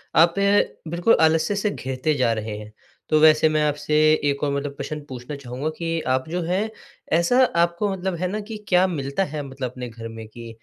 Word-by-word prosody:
आप 165 +1 +6
ना 200 -4 +1
बिल्कुल 175 +6 +3
आलस्य 160 +4 +3
से 205 +1 0
घिरते 130 -2 -2
जा 125 -4 +2
रहे 110 -1 -4
हैं। 105 0 -10 0.4
तो 155 - +4
वैसे 155 0 +6
मैं 155 0 +1
आपसे 150 +1 -1 0.3
एक 140 +1 -2
और 140 - +1
मतलब 140 0 -3
प्रश्न 150 +2 -4
पूछना 125 +3 -7
चाहूँगा 135 +2 -4
कि 165 -1 -2
आप 130 +3 0
जो 175 +1 -2
हैं, 190 +6 -1 0.4
ऐसा 210 +11 +4
आपको 170 0 +1
मतलब 190 -1 -2
है 180 +2 -2
ना 215 - -2
कि 215 +1 -7
क्या 180 0 +4
मिलता 140 +1 -2
है 150 -3 -4
मतलब 130 -2 -5
अपने 125 -1 -7
घर 115 0 -8
में 115 -1 -9
कि 115 +1 -10
155 Hz, 210 wpm, -23 LUFS, 130-175 Hz, 0.4 s, आप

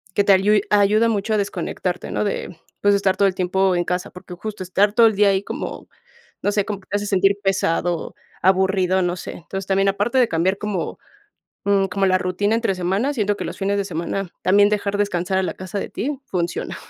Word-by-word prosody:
que 205 - +3
te 200 - +6
ayu 205 +3 +4
ayuda 210 +2 +4
mucho 215 0 -1
a - - +2
desconectarte, 195 -3 -3
¿no? - - -1
De, 200 -3 -3 0.3
pues 205 0 +4
estar 195 -1 +1
todo 200 - +4
el 190 - 0
tiempo 185 +1 +1
en 175 - +1
casa, 180 0 -2
porque 180 0 -11
justo 210 +2 -7
estar 200 +3 +2
todo 230 +1 +6
el 220 - +1
día 205 0 +4
ahí 195 0 +1
como, - - -6 0.6
no 205 - +2
sé, 205 -1 0
como 205 -2 -4
te 190 - -6
hace 205 - -4
sentir 195 0 +3
pesado, 175 -3 0 0.3
aburrido, 190 0 +2
no 175 0 0
sé. - - -7
Entonces, 195 +3 -7
también 195 0 +2
aparte 205 +6 0
de 245 - +4
cambiar 180 +4 +1
como 205 -5 -3 0.7
mm, 200 -1 +3
como 195 +1 0
la 185 0 +3
rutina 185 +4 0
entre 230 -4 0
semana, 190 +10 0
siento 205 -5 0
que - - -4
los - - -6
fines 200 +1 0
de 200 - -1
semana, 180 +2 -3
también 200 +2 +5
dejar 205 -1 -1
descansar 190 -2 0
a - - 0
la - - -2
casa 185 +2 -5
de - - -5
ti, 275 +2 -3
funciona. 175 -5 -3
195 Hz, 215 wpm, -21 LUFS, 185-205 Hz, 0.7 s, te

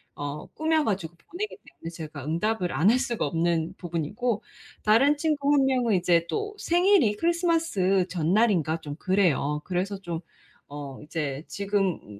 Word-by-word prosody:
어 145 +1 -5
꾸며 315 -1 0
가지고 180 -5 -2
보내기 405 - -6
때문에 165 - -11
제가 155 -4 -8
응답을 180 +4 -1
안 180 +6 +3
할 250 +3 +4
수가 240 -4 -1
없는 165 +1 0
부분이고 185 +7 -2 0.4
다른 270 +8 +4
친구 290 -2 +1
1 275 -2 +4
명은 250 -5 +2
이제 175 -2 +3
또 420 0 -3
생일이 350 - +3
크리스마스 330 - +1
전날인가 175 -2 +2
좀 145 -2 -7
그래요. 155 -5 +1
그래서 190 +2 -2
좀 170 -3 -4 0.5
어 145 -2 -7
이제 150 -1 -4
지금 200 -3 0
음 105 -1 -12
190 Hz, 305 characters per minute, -26 LUFS, 160-255 Hz, 0.5 s, 할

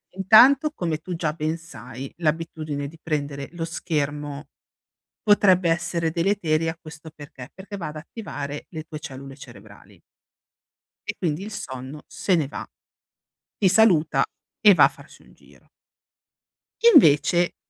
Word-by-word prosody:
intanto, 245 - +6
come 165 - -2
tu 180 +2 -6
già 160 -2 -2
ben 155 +1 -2
sai, 130 -5 -10
l'abitudine 155 -3 -2
di 165 +3 -13
prendere 145 -3 -3
lo 170 -1 -4
schermo, 150 -3 -3 0.7
potrebbe 190 -4 +4
essere 165 0 0
deleteria. 165 -2 0
Questo 160 0 -11
perché? 145 -3 -12
Perché 200 +1 -9
va 170 -5 -5
ad 155 - -9
attivare 145 - -7
le 160 -2 -7
tue 155 -1 -8
cellule 135 -3 -9
cerebrali. 100 -6 -15 1.1
E - - -3
quindi 170 +1 -2
il 215 - -8
sonno 135 -5 -7
se 185 - 0
ne 150 -5 0
va. - - -7 0.9
Ti 195 - +4
saluta 165 -9 +4 0.4
e 205 -3 +7
va - - +6
a - - +6
farsi - - -17
un - - -21
giro. - - -23 1.2
Invece, 165 +3 +5
155 Hz, 135 wpm, -23 LUFS, 145-175 Hz, 1.2 s, e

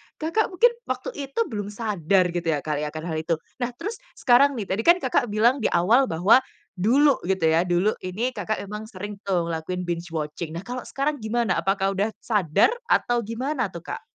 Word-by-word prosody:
Kakak 335 +8 0
mungkin 460 +6 +4 0.2
waktu - - -3 0.2
itu 275 - -6
belum 205 -2 -3
sadar, 200 -4 +1
gitu 170 -1 -3
ya, 150 -3 0
kali, 150 -1 -2
akan 155 +1 -6
hal 160 -2 -3
itu. 165 +1 0 0.2
Nah, 245 - 0
terus 420 - -5 0.2
sekarang 270 +2 +4
nih, 225 - -3
tadi 190 - -1
kan 345 - +8
Kakak 260 -7 0
bilang 230 +5 +2
di 220 - +1
awal 220 +10 +3
bahwa 185 +8 +5 0.4
dulu 275 +8 +4
gitu 190 -3 0
ya, 170 +3 +2
dulu 180 +4 +2
ini 210 +8 -2
Kakak 215 -4 -3
emang 210 +2 -7
sering 205 -1 -8
tuh 175 -3 0
lakuin 180 +3 -3
binge 175 0 -3
watching, 155 +1 -4
nah, 170 - -5
kalau 250 +3 -6
sekarang 290 +2 -1
gimana 220 -3 0
apakah 195 0 +1
udah 200 +3 -1
sadar 205 - +3 0.2
atau 240 0 +2
gimana 255 +5 -2
tuh, 170 0 -8
Kak? - - -7
205 Hz, 195 wpm, -24 LUFS, 175-245 Hz, 0.4 s, kan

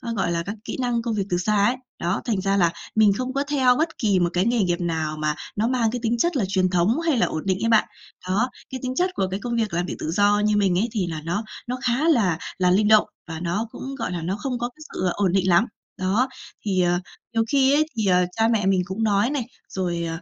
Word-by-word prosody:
gọi 195 -4 0
là 170 0 -1
các 200 +5 -5
kỹ - - -4
năng 240 -2 0
công 230 -1 -2
việc 200 - 0
từ 175 - +1
xa 205 +2 +2
ấy, 240 - +2 0.2
đó, 175 +3 -1
thành 215 -6 0
ra 195 +1 +1
là 170 -3 +3 0.2
mình 215 -2 +5
không 255 0 -3
có 275 +1 0
theo 270 -4 +3
bất 320 +2 -1
kỳ 210 -8 +2
một 175 - +2
cái 180 +2 +2
nghề 235 +1 +2
nghiệp 175 -2 0
nào 160 -3 -2
mà 150 0 0 0.2
nó 215 +3 +1
mang 245 -3 +1
cái 245 - -3
tính 235 +1 +1
chất 345 +5 +1
là 210 - +1
truyền 185 -1 +1
thống 185 - +2
hay 325 -6 +1
là - - +3
ổn 155 - -3
định 190 -1 +1
ấy 230 - +2
bạn. 220 -2 +4 0.4
Đó, 210 +7 +1 0.2
cái 260 - -5
tính 255 0 -2
chất 365 +4 +2
của 190 - 0
cái 190 - -2
công 235 +3 -3
việc 220 -5 -1
làm 175 +1 0
việc - - -4
tự 155 - -3
do 205 +3 +3
như 210 0 +2
mình 190 -3 +2
ấy, 220 - +1
thì 205 -6 -1
là 160 -2 -4
nó 175 +6 -1 0.2
nó 250 - -2
khá 255 +6 +1
là 200 - +3 0.2
là 180 -1 +3
linh 205 +3 +3
động 215 0 +6 0.2
và 160 0 -6
nó 180 +6 -2
cũng, 270 +1 -7
gọi 230 - -3
là, 175 -2 -3
nó 180 +4 -2
không 250 +2 -3
có 240 - -2
cái 305 +5 -21
sự 185 - 0
ổn 195 -3 +1
định 190 -1 +2
lắm. 175 +6 +5 0.3
Đó, 200 +8 +1 0.4
thì, 190 -3 +1
ờ, 175 0 +2 0.3
nhiều 225 -1 +2
khi 275 -1 +4
ấy 305 +2 +4
thì, 220 - 0
ờ, 180 -1 +4
cha 225 +3 +2
mẹ 225 -4 +1
mình 190 -1 +3
cũng 190 +4 -3
nói 210 +2 +2
này, 285 -3 -1 0.3
rồi, 175 -3 -2
205 Hz, 275 wpm, -23 LUFS, 180-240 Hz, 0.4 s, động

